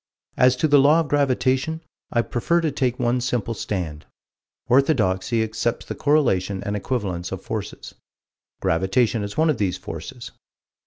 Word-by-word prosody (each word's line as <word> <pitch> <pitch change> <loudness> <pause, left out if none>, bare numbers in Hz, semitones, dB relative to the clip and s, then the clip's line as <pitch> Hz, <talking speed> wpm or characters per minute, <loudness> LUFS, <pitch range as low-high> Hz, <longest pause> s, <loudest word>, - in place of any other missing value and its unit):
As 125 0 +4
to 155 - +1
the 145 -1 +5
Law 150 +4 +5
of 155 - -5
Gravitation, 140 +2 +1 0.3
I 120 - +2
prefer 170 +10 0
to 160 -2 0
take 130 -3 -1
one 125 0 +1
simple 120 -2 -1
stand: 85 -9 -4 0.6
Orthodoxy 120 -5 +2
accepts 110 +1 -2
the - - -5
correlation 100 -11 +1
and 100 - -2
equivalence 95 -6 -3
of - - -6
forces: - - -6 0.7
Gravitation 105 +7 +1
is 100 0 -6
one 160 0 +4
of 145 - -4
these 95 -3 0
forces. 120 - -8
120 Hz, 150 wpm, -23 LUFS, 100-135 Hz, 0.7 s, the